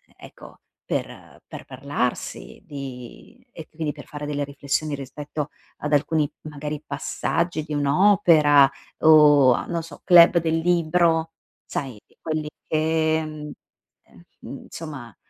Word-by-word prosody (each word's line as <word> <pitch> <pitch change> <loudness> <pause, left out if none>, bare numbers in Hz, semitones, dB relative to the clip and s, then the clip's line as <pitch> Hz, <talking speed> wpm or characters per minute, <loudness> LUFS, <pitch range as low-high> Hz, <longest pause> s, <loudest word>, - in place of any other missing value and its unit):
e - - -13
ecco, - - -16 0.3
per - - -5
per - - -9
parlarsi 135 -2 -4
di 135 - -10
e 160 - -10
quindi 155 -1 -4
per - - -11
fare 150 0 -7
delle 145 -1 -2
riflessioni 140 +2 -3
rispetto 145 +2 -6 0.3
ad 150 0 -3
alcuni, 150 0 +1
magari, 150 0 -6
passaggi 155 +3 -2
di 150 0 -7
un'opera, 145 -2 +5 0.3
o 145 -4 +6
a, - - -3
non 170 -1 -3
so, 160 -3 -12
club 175 -1 +7
del 165 -1 0
libro, 165 -1 +1 0.3
sai 130 -6 -5
di - - -31
quelli 155 -1 -3 0.2
che, 160 0 +1
mhmm, 150 -1 -8 0.5
ehm, 85 - -20 0.3
mhmm, - - -6
insomma, 145 -9 -9
150 Hz, 135 wpm, -23 LUFS, 140-160 Hz, 0.5 s, club